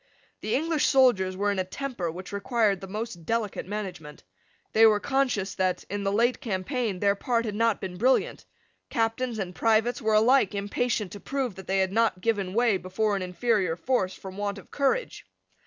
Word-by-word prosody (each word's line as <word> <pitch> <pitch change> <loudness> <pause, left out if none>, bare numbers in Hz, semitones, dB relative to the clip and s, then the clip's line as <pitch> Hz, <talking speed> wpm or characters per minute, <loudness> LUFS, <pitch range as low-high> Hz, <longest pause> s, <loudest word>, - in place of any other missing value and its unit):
The 215 - -1
English 315 +1 +1
soldiers 215 -9 +3
were 205 +1 +1
in 200 - -1
a - - +1
temper 195 -2 -4
which 180 +5 -8
required 205 -2 +1
the 195 - -7
most 210 -3 -5
delicate 220 -1 -2
management. 185 -7 -6 0.5
They 225 +1 +7
were 210 -1 +4
conscious 250 -8 0
that, 185 -1 -1
in 205 0 -2
the 195 - 0
late 235 +4 +2
campaign, 215 +1 -2
their 200 0 +3
part 230 +3 -1
had 210 - -3
not 225 +1 +1
been 185 -2 -6
brilliant. 255 +6 +1 0.5
Captains 230 0 -1
and 185 -3 -4
privates 225 +5 +2
were 220 -1 +2
alike 220 -1 +4
impatient 205 0 -1
to 205 - -8
prove 265 -1 -2
that 190 0 -11
they 195 - +1
had 190 -1 +1
not 225 -4 +2
given 200 -3 -1
way 235 -4 +3
before 200 +3 -1
an 195 - -2
inferior 185 -1 0
force 190 -1 -1
from 190 0 -10
want 205 0 -2
of 200 - -13
courage. 290 - 0
210 Hz, 190 wpm, -27 LUFS, 190-235 Hz, 0.5 s, They